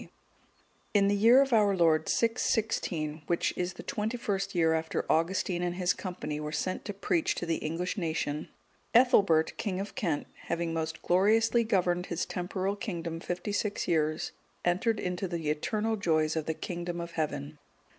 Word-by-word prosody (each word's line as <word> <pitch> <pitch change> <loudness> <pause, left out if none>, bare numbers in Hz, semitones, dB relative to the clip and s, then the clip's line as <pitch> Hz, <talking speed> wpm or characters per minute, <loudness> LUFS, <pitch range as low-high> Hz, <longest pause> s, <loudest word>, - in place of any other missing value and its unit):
D.] - - -12 0.9
In 200 -1 +5
the 205 - +3
year 235 +6 +7
of 270 -2 -3
our 205 -3 +4
Lord 160 -2 +3
616, 205 -9 0
which 170 - +1
is 180 0 -2
the - - -10
twenty 220 +3 -2
first 195 -4 -2
year 165 -2 +4
after 160 0 -1
Augustine 175 +2 +1
and 175 0 -1
his 180 -1 +2
company 175 -5 -5
were 150 0 -4
sent 185 +4 -2
to 205 - -4
preach 180 -4 0
to - - -3
the 165 -1 0
English 175 +6 -3
nation, 155 -3 -2 0.5
Ethelbert, 200 -10 +5
king 190 -4 -2
of 200 +1 -5
Kent, 170 - -1 0.2
having 170 -1 -1
most 160 -1 -3
gloriously 225 +6 +4
governed 180 -4 +1
his 170 0 -2
temporal 185 +2 -2
kingdom 170 -5 -4
fifty 175 +4 -4
six 205 0 -1
years, 155 -1 0 0.3
entered 215 +5 +1
into 180 0 -2
the 165 -4 -2
eternal 215 +8 -1
joys 160 -6 +1
of 160 -2 -2
the 160 - -1
kingdom 175 0 -4
of 170 0 -5
Heaven. 150 -2 -3
175 Hz, 170 wpm, -30 LUFS, 160-205 Hz, 0.9 s, year